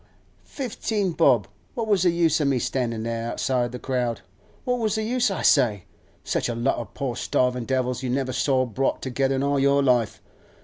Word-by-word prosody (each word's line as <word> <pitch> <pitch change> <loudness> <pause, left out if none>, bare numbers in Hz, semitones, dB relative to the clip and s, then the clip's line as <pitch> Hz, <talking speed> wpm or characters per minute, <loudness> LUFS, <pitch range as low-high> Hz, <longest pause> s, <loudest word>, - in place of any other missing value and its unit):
Fifteen 220 -6 -2
bob! 135 -10 +3 0.3
What 230 - -2
was 205 -4 +3
the 180 - +4
use 165 -2 +2
o' - - +1
me 140 -2 +2
standin' 115 -2 -2
there, 115 0 -3
outside 125 -2 0
the 125 - -5
crowd? 125 -3 -2 0.4
What 250 -1 0
was 220 -2 0
the 220 - -1
use, 245 +1 +1
I 195 - -3
say? 110 - +3 0.4
Such - - -1
a 120 - -2
lot 120 +4 0
o' - - -4
poor 135 -5 -4
starvin' 125 0 0
devils 125 -1 -1
you 130 - -3
never 130 0 -1
saw 130 -1 +2
brought 130 +3 -1
together 135 +1 0
in 135 - -1
all 140 0 +1
your 140 +1 +3
life. 125 -4 +2
135 Hz, 200 wpm, -24 LUFS, 125-165 Hz, 0.4 s, the